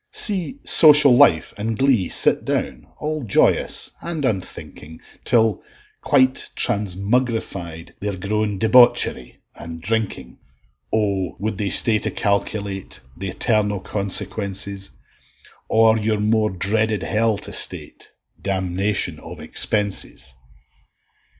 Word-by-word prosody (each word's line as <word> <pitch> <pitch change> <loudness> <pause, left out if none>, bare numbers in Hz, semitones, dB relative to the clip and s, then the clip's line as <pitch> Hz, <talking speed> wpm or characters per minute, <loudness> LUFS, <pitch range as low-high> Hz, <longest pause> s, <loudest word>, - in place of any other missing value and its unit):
See 205 - 0
Social 145 -5 +7
Life 105 - +3
and 110 +1 -3
Glee 130 -10 +1
sit - - +1
down, - - -4
All 155 0 -4
joyous 105 - +1
and 165 -4 -4
unthinking, 90 - -6 0.2
Till, 115 -2 +1 0.4
quite 130 -2 +1
transmugrified, 100 -4 -3
they're 100 -1 -5
grown 105 +2 -3
Debauchery 110 - +2
and 85 -1 -10
Drinking: 105 - -4 0.5
O 100 -6 -2
would 105 -1 -5
they 100 -2 -2
stay 110 +1 +7
to - - -1
calculate 100 -1 -3 0.2
Th' 95 - -6
eternal 105 +1 -1
consequences; 100 0 -3 0.8
Or 110 0 +3
your 110 0 -2
more 110 0 0
dreaded 105 +3 -1
hell 110 0 -1
to - - -9
state, - - -1 0.3
Damnation 95 -3 -1
of 85 0 -11
expenses! 95 -2 -1
105 Hz, 105 wpm, -20 LUFS, 95-115 Hz, 0.8 s, Social